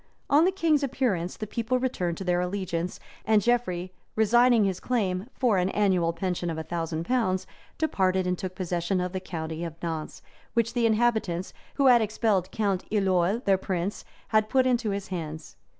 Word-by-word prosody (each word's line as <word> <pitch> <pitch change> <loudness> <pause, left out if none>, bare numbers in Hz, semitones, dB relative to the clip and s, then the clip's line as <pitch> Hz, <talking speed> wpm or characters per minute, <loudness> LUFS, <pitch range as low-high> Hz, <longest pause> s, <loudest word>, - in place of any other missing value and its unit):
On 300 +4 +6
the 370 - +3
king's 325 -6 +2
appearance, 240 -10 -1
the 215 - -4
people 230 +4 -1
returned 180 -10 -1
to - - -5
their 180 -1 +1
allegiance; 180 -2 -3 0.2
and 215 -1 +4
Geoffrey, 185 -6 0 0.2
resigning 235 +1 +5
his 190 -2 -1
claim 200 -5 -1
for 230 -7 +2
an 180 +1 +1
annual 185 -5 +2
pension 175 0 -2
of 160 - -3
a 160 - -3
thousand 165 -1 -3
pounds, 205 -7 0 0.3
departed 190 - +1
and 180 0 +1
took 185 0 -6
possession 180 0 -1
of 180 0 -2
the 190 - -2
county 165 -3 -5
of 165 -1 -6
Nantz, 160 -2 -5 0.3
which 230 0 +1
the 240 -2 +2
inhabitants, 220 -6 +1 0.2
who 280 - +2
had 245 -3 +7
expelled 210 -3 +1
Count 200 -4 -1
Iloel, 195 +2 +1
their 195 -1 +3
prince, 185 +1 -3 0.3
had 215 -1 +2
put 260 +1 +3
into 245 -3 +1
his 200 -1 -3
hands. 160 -4 -6
190 Hz, 180 wpm, -27 LUFS, 180-230 Hz, 0.3 s, had